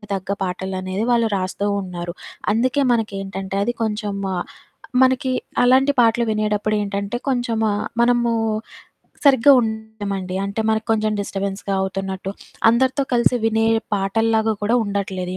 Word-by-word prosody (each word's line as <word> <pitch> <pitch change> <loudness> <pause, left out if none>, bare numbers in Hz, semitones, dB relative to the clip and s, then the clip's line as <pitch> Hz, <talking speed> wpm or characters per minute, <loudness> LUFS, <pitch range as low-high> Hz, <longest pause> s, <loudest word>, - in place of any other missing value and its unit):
తగ్గ 190 0 -7 0.2
పాటలనేది 185 +3 -3
వాళ్ళు 230 -2 +3
రాస్తూ 190 +2 -3 0.2
ఉన్నారు. 175 -1 -6 0.4
అందుకే 255 +5 +1
మనకేంటంటే, 195 -3 -3
అది 240 0 -1
కొంచెమా 205 -3 -2
ఆహ్, 175 - -3 0.6
మనకి 260 0 +2 0.3
అలాంటి 265 +3 +5
పాటలు 235 +1 +3
వినేటప్పుడేంటంటే, 210 0 -1
కొంచెమా 230 -4 0 0.3
మనమూ 240 -1 +3 0.9
సరిగ్గా 275 0 +7
ఉండమండి. 220 -4 -4
అంటే, 200 +3 -2
మనకు 220 0 0
కొంచెం 215 -1 +1
డిస్టర్బెన్స్‌గా 200 0 -3
అవుతున్నట్టు, 190 0 -3 0.4
అందరితో 260 +4 +2
కలిసి 240 +1 +3
వినే 225 0 +2 0.3
పాటల్లాగా 220 +2 +1
కూడా 215 +3 +1
ఉండట్లేదు 190 -3 -3
215 Hz, 115 wpm, -21 LUFS, 195-230 Hz, 0.9 s, సరిగ్గా